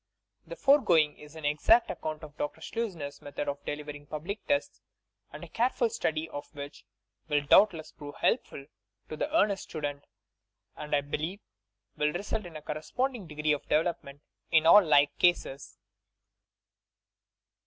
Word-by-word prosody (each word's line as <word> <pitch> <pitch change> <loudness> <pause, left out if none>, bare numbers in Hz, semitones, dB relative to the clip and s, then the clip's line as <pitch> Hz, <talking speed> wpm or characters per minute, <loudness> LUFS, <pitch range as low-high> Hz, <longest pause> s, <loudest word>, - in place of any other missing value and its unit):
The - - -7
foregoing 180 - +4
is 150 +1 -13
an 160 -2 -7
exact 155 +11 +4
account 155 0 -5
of 150 -1 -10
Dr. 145 - -4
Schleusner'a 175 -12 -5
method 145 0 -5
of 140 0 -4
delivering 145 0 -6
Public 170 +9 -5
Tests, 285 0 -1 0.5
a - - -9
careful 240 -1 0
study 155 +1 -1
of 145 - -7
which 145 0 -9 0.4
will 145 -2 +1
doubtless 165 -1 +4
prove 145 -1 -10
helpful 135 - -1 0.4
to - - -5
the 295 - -3
earnest 205 - +1
stu 155 - -6
dent; 145 -1 -4 0.7
and, 150 0 -2
I 145 - +2
believe, 155 +7 -4 0.6
will 150 0 +1
result 200 +1 -3
in 165 - -13
a 155 - -8
corresponding 210 - -3
de 150 - -11
gree 150 0 +1
of 145 - -2
development 150 -3 -1 0.3
in 160 -1 +4
all 200 +5 +9
like 145 -3 +4
cases. 160 -6 +1
155 Hz, 150 wpm, -29 LUFS, 145-195 Hz, 0.7 s, all